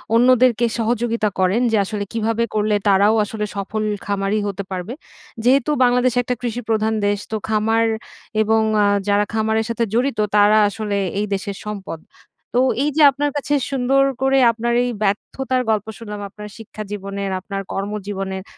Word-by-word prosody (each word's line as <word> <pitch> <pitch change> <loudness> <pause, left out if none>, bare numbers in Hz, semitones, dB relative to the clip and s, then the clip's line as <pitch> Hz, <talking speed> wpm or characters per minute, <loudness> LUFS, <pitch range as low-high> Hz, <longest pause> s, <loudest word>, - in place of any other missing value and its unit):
অন্যদেরকে 245 -1 +4
সহযোগিতা 230 -1 0
করেন, 190 +6 +2
যে 220 - +3
আসলে 210 0 -3
কীভাবে 225 0 0
করলে 210 0 +2
তারাও 200 +2 +4
আসলে 210 0 -4
সফল 200 +2 -3 0.2
খামারি 200 +1 -1
হতে 200 0 -4
পারবে। 185 +5 -4 0.5
যেহেতু 265 +3 +3
বাংলাদেশ 250 0 +3
একটা 250 +1 -2
কৃষিপ্রধান 225 -2 -1
দেশ। 205 0 0
তো 220 - -1
খামার 225 +1 +2 0.6
এবং 220 +1 +3 0.2
আ - - +4 0.2
যারা 205 0 +3
খামারের 220 0 +1
সাথে 230 0 0
জড়িত, 245 0 0 0.2
তারা 210 +1 +5
আসলে 205 -1 -3 0.2
এই 210 - 0
দেশের 195 0 -3
সম্পদ। 195 -6 -6 0.6
তো 250 - +5 0.2
এই 295 - +2
যে - - +4
আপনার 290 +2 -1
কাছে 290 0 -2 0.2
সুন্দর 270 +1 +2 0.2
করে, 270 0 +3
আপনার 235 +1 -2
এই 245 - -1
ব্যর্থতার 255 +6 -1
গল্প 215 -1 0
শুনলাম 210 -2 -7
আপনার 210 +1 -10
শিক্ষা 215 -1 -8
জীবনের, 200 -1 -4
আপনার 195 +1 -5
কর্মজীবনের, 195 -1 -4
220 Hz, 155 wpm, -20 LUFS, 205-240 Hz, 0.6 s, তারা